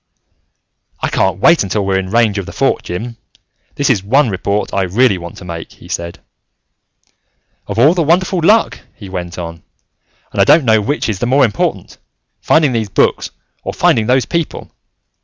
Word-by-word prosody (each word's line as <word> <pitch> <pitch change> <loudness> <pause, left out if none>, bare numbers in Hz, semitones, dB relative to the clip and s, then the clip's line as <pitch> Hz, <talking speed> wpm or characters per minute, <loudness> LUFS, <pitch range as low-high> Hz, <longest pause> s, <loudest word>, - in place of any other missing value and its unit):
"I - - -1
can't 95 -1 0
wait 165 - +4
until 100 +1 -1
we're 95 -1 +1
in 95 - -4
radio 110 +5 -1
range 105 - -6
of 95 - -6
the - - -7
Fort, - - 0
Jim. 115 +7 -6 0.6
This 140 - 0
is 115 -8 +2
one 125 +3 +2
report 100 +2 -2
that - - -3
I - - +2
really 100 +2 +2
want 85 0 -9
to 90 - -11
make," 85 -2 -7
he - - -16
said. 85 0 -5 1.5
"Of - - -5
all 140 +8 +5
the 180 - 0
wonderful 175 +4 +1
luck!" 215 +7 +3 0.2
he 100 -4 -11
went 90 -2 -6
on. 85 -1 -7 0.7
"And - - 0
I - - +7
don't 155 -4 +4
know 110 -2 +4
which 145 +9 -2
is 105 -4 -3
the 120 - -1
more 135 +2 +4
important: 105 - -3 0.4
finding 155 -4 +3
those 110 -3 -2
books, - - +1 0.3
or - - -5
finding 110 -1 +2
those 125 -1 +2
people. 170 -2 -4
110 Hz, 190 wpm, -15 LUFS, 95-140 Hz, 1.5 s, I